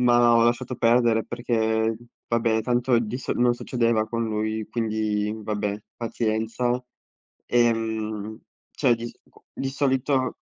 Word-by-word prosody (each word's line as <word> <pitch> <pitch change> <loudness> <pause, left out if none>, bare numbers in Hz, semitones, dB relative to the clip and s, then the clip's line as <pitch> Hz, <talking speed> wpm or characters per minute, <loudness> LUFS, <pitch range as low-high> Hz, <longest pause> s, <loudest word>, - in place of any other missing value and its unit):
ma 120 -1 +5
ho 115 - +5
lasciato 120 +1 0
perdere 115 -1 +3
perché, 110 -2 0 0.3
vabbè 115 -1 +2
tanto 120 0 +2
di 115 +1 -3
so - - -2
non 120 0 +3
succedeva 115 -2 0
con 115 +1 -2
lui, 110 0 -2
quindi 110 -2 -1
vabbè 105 -1 -2 0.2
pazienza. 115 +2 -1 0.7
Ehm, 110 -2 0 0.3
cioè 125 -5 +3
di 115 +1 -6
sicu - - -15
di 135 - -3
solito 135 -1 +1
115 Hz, 125 wpm, -25 LUFS, 110-120 Hz, 0.7 s, ma